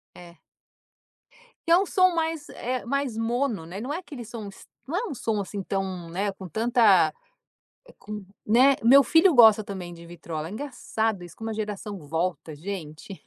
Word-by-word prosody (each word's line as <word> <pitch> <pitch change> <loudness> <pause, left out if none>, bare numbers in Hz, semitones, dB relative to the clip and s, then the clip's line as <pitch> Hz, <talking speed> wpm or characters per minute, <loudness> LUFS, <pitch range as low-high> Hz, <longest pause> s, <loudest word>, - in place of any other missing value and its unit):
É. 175 -2 -13 1.3
E - - +1
é 345 - +8
um 390 - +2
som 370 -2 +3
mais, 320 -2 -2
eh, 250 -1 -4
mais 275 -3 -2
mono, 230 -5 -1
né, 190 +5 -7
não 265 +4 -4
é - - -2
aquele 290 -9 -8
som 220 -2 -8
s 195 - -15 0.2
não 325 - -3
é 455 +5 -1
um 280 - -5
som, 215 -3 -1
assim, 195 0 -5
tão, 190 -3 -3
né, 200 +3 -1
com 190 -1 -9
tanta 220 -6 +4 0.9
com, 210 0 -8 0.2
né, 255 +5 +5
meu 270 +4 +8
filho 325 +6 +5
gosta 220 -3 +7
também 185 -4 -7
de 170 0 -12
vitrola, 165 -2 -6
engraçado 225 -5 -3
isso 175 - -12
como 225 0 -5
a - - -3
geração 210 -2 -5
volta 165 -1 -2
gente. 175 +1 -8
215 Hz, 175 wpm, -26 LUFS, 185-255 Hz, 1.3 s, é